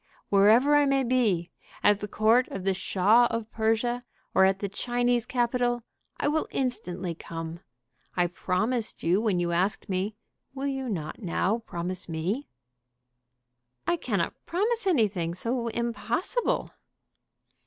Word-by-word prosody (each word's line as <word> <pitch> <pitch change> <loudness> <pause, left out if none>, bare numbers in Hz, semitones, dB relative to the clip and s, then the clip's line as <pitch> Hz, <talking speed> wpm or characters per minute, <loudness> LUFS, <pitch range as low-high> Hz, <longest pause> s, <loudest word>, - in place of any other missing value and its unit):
Wherever 220 +9 +5
I 290 -1 +5
may 275 -1 +3
be, 225 -9 +1 0.3
at 205 -1 +5
the 210 - -4
court 225 +5 +3
of 195 - -6
the 195 0 +2
Shah 205 +6 +4
of 230 -1 -4
Persia 225 +2 +1 0.3
or 190 - +6
at 190 0 +3
the 200 - -3
Chinese 245 +3 0
capital, 240 -1 0 0.3
I - - 0
will 310 +2 +1
instantly 190 -9 -2
come. 165 0 -7 0.6
I 175 - +4
promised 210 +7 -1
you 180 +5 +3
when 210 -6 +1
you 175 0 0
asked 190 +5 0
me. 195 +3 -1 0.4
Will 270 +1 -3
you 270 -2 -2
not 165 -1 -4
now 195 +4 0
promise 180 -4 -5
me?" 180 - -2 1.4
"I - - +2
cannot 205 - -1
promise 425 +5 0
anything 200 - +1
so 235 +4 -2
impossible." 235 - -1
220 Hz, 135 wpm, -27 LUFS, 185-245 Hz, 1.4 s, or